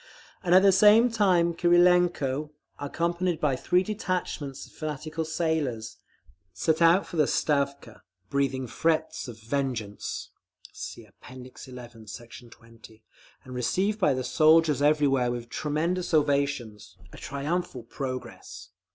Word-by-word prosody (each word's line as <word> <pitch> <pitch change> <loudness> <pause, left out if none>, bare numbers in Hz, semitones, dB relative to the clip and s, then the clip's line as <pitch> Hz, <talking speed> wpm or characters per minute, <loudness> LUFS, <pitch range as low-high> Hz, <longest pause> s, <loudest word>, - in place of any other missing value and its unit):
And 180 0 +3
at 190 - +7
the 200 - +7
same 215 +5 +6
time 180 -6 +2
Krylenko, 175 -5 +3 0.3
accompanied 170 +3 -1
by 145 -5 +1
three 180 +8 +1
detachments 185 -9 -4
of - - -18
fanatical 155 +1 -5
sailors, 155 -8 -2 0.6
set 160 - 0
out 170 +4 +5
for 175 - -8
the 150 -3 +3
Stavka, 140 -6 -1 0.3
breathing 135 +1 -1
threats 160 +4 -1
of 115 -2 -9
vengeance, 115 -4 -4 0.4
(See - - -8
App. - - -25 0.2
XI, 125 -2 -11
Sect. 120 +2 -10 0.2
20) 115 -1 -17 0.4
and 130 - -10
received 190 - 0
by 150 -9 +3
the 130 - -3
soldiers 155 0 +4
everywhere 145 -4 +3
with 120 -1 -5
tremendous 165 +5 -1
ovations—a 120 -10 -2
triumphal 140 -1 -3
progress. 130 +2 -7
145 Hz, 120 wpm, -27 LUFS, 125-170 Hz, 0.6 s, at